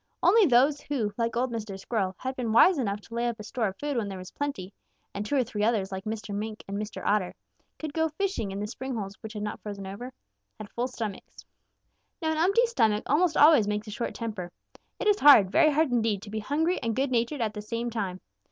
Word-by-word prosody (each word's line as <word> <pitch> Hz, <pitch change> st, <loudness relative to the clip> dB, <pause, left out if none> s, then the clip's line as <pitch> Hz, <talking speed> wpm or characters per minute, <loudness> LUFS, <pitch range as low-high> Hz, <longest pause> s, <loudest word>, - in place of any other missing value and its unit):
Only 400 Hz, +2 st, +6 dB
those 275 Hz, +3 st, +4 dB
who, 230 Hz, -8 st, -2 dB
like 230 Hz, 0 st, -1 dB
old 250 Hz, +1 st, 0 dB
Mr. 215 Hz, -4 st, -5 dB
Squirrel, 195 Hz, -3 st, -2 dB
had 260 Hz, 0 st, -4 dB
been 240 Hz, -4 st, -2 dB
wise 295 Hz, +9 st, +6 dB
enough 205 Hz, -4 st, -2 dB
to 230 Hz, -, -14 dB
lay 235 Hz, +1 st, 0 dB
up 235 Hz, -2 st, -3 dB
a -, -, -7 dB
store 220 Hz, +1 st, -1 dB
of 190 Hz, -, -5 dB
food 290 Hz, +1 st, -3 dB
when 220 Hz, -3 st, -1 dB
there 195 Hz, -1 st, -6 dB
was 185 Hz, 0 st, -9 dB
plenty, 210 Hz, -10 st, -4 dB, 0.4 s
and 200 Hz, -, -3 dB
two 250 Hz, +7 st, -2 dB
or 265 Hz, -, +3 dB
three 210 Hz, -3 st, -3 dB
others 215 Hz, -4 st, +1 dB
like 190 Hz, 0 st, -5 dB
Mr. 215 Hz, -1 st, -4 dB
Mink 215 Hz, +1 st, -4 dB
and 200 Hz, -, -5 dB
Mr. 210 Hz, +1 st, -5 dB
Otter, 205 Hz, -3 st, +1 dB, 0.2 s
who -, -, -39 dB
could 310 Hz, -2 st, -6 dB
go 320 Hz, 0 st, +1 dB
fishing 340 Hz, -, -2 dB
in 195 Hz, -, -5 dB
the 205 Hz, -, -2 dB
spring 260 Hz, +4 st, -5 dB
holes 200 Hz, -3 st, -4 dB
which 220 Hz, 0 st, -8 dB
had 210 Hz, -1 st, -5 dB
not 210 Hz, -, -4 dB
frozen 200 Hz, -2 st, -6 dB
over, 200 Hz, +7 st, -7 dB, 0.5 s
had 215 Hz, -2 st, -9 dB
full 245 Hz, +1 st, -1 dB
stomachs. 220 Hz, -6 st, -7 dB, 0.7 s
"Now 320 Hz, -3 st, 0 dB
an 315 Hz, -, -1 dB
empty 395 Hz, +8 st, +4 dB
stomach 220 Hz, -, +1 dB
almost 315 Hz, +2 st, +2 dB
always 295 Hz, -8 st, +7 dB
makes 210 Hz, 0 st, -2 dB
a 210 Hz, -, -8 dB
short 235 Hz, -, -4 dB
temper. 210 Hz, -7 st, -5 dB, 0.5 s
It -, -, -3 dB
is 415 Hz, -1 st, +4 dB
hard, 220 Hz, -10 st, +8 dB
very 310 Hz, -, +5 dB
hard 305 Hz, -1 st, +2 dB
indeed 220 Hz, -4 st, +1 dB
to 205 Hz, -, -9 dB
be 220 Hz, -, -2 dB
hungry 315 Hz, -, 0 dB
and 230 Hz, -1 st, -1 dB
good 270 Hz, +1 st, 0 dB
natured 240 Hz, +3 st, 0 dB
at 215 Hz, -2 st, -1 dB
the 210 Hz, -, -6 dB
same 230 Hz, +3 st, -3 dB
time. 190 Hz, -5 st, -3 dB
230 Hz, 245 wpm, -27 LUFS, 210-280 Hz, 0.7 s, hard